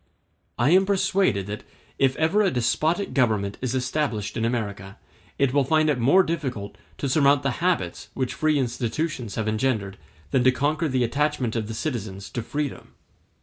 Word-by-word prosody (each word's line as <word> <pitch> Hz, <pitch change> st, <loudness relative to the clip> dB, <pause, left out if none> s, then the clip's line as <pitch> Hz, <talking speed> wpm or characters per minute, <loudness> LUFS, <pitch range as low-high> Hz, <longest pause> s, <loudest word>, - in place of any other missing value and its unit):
*d -, -, -40 dB, 0.6 s
I -, -, +5 dB
am 190 Hz, +2 st, +5 dB
persuaded 190 Hz, -, +2 dB
that, 105 Hz, +1 st, -6 dB, 0.4 s
if 135 Hz, -1 st, +3 dB
ever 165 Hz, +7 st, +2 dB
a 200 Hz, -, +3 dB
despotic 160 Hz, -, 0 dB
government 110 Hz, -6 st, +1 dB
is 130 Hz, 0 st, -1 dB
established 125 Hz, -6 st, -1 dB
in 115 Hz, -, -1 dB
America, 100 Hz, -5 st, -3 dB, 0.4 s
it 140 Hz, -2 st, +2 dB
will 140 Hz, -1 st, +4 dB
find 155 Hz, +2 st, +3 dB
it 130 Hz, -, -1 dB
more 140 Hz, +11 st, +5 dB
difficult 130 Hz, -, -4 dB, 0.2 s
to 140 Hz, -, -2 dB
surmount 140 Hz, +1 st, +4 dB
the 140 Hz, -2 st, -1 dB
habits 180 Hz, -1 st, -1 dB
which 130 Hz, -1 st, -1 dB
free 155 Hz, +4 st, +1 dB
institutions 125 Hz, -1 st, -2 dB
have 110 Hz, -1 st, -2 dB
engendered 110 Hz, -3 st, -1 dB, 0.3 s
than 125 Hz, -, +3 dB
to 130 Hz, -, +6 dB
conquer 150 Hz, +5 st, 0 dB
the 130 Hz, -2 st, +1 dB
attachment 140 Hz, -1 st, 0 dB
of 110 Hz, -2 st, -2 dB
the 110 Hz, -, -5 dB
citizens 110 Hz, -8 st, -4 dB
to 120 Hz, -, -3 dB
freedom. 145 Hz, +5 st, -5 dB
130 Hz, 175 wpm, -24 LUFS, 110-155 Hz, 0.6 s, to